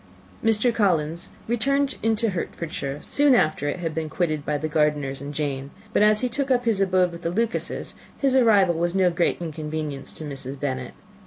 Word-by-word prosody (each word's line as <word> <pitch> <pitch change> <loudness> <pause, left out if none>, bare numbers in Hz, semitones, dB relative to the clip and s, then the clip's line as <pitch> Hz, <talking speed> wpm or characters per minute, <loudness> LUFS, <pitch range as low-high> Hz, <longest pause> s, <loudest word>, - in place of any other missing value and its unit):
Mr. 225 +2 +4
Collins 170 -6 +1 0.2
returned 275 +4 +1
into 225 0 +1
Hertfordshire 155 -5 -4
soon 285 -2 +4
after 155 - +1
it - - -2
had 165 -3 -3
been 160 -1 -3
quitted 155 -3 -1
by 150 0 -1
the 155 +2 -2
Gardiners 150 -3 0
and 140 +1 -5
Jane; 140 -2 -3 0.2
but, - - +3
as 210 0 +5
he 250 - +1
took 275 +3 -2
up 245 -1 +2
his 220 -4 +2
abode 185 -2 +3
with 170 0 -9
the 165 - -1
Lucases, 225 +5 -1 0.2
his 270 -2 +2
arrival 210 -8 +5
was 170 +2 -1
no 185 -2 +4
great 170 0 +1
inconvenience 155 -3 -4
to - - -7
Mrs. 135 -2 -5
Bennet. 130 -3 -3
170 Hz, 185 wpm, -24 LUFS, 150-220 Hz, 0.2 s, as